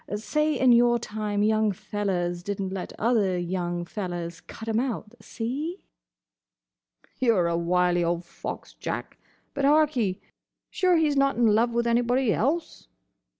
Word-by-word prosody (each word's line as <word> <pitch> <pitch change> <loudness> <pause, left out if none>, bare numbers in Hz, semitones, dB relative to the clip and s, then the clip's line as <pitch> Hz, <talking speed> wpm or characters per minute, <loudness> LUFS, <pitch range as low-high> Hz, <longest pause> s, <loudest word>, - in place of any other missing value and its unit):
Say 300 +7 0
in 255 -1 +5
your 240 0 +5
time 210 -2 -2
young 215 0 +3
fellers 180 -3 -2
did 200 +2 -4
n't 190 -1 -3
let 190 - -5
other 210 -6 +2
young 175 -1 -2
fellers 175 -3 -5
cut 225 - -10
'em 225 0 +1
out. 235 -3 -3
See?" 285 +11 -4 1.4
"You 235 -3 +3
're 180 -3 +2
a 170 - 0
wily 175 +1 +2
old 170 +1 -1
fox, 175 - -7
Jack. - - -5 0.3
But, 280 - -3
hark'ee! 275 -10 +3 0.5
Sure 365 -1 +3
he's 305 -3 +2
not 275 0 +3
in 240 - +2
love 225 +2 +4
with 235 0 +1
anybody 240 0 +2
else?" 305 - -1
215 Hz, 150 wpm, -26 LUFS, 180-250 Hz, 1.4 s, in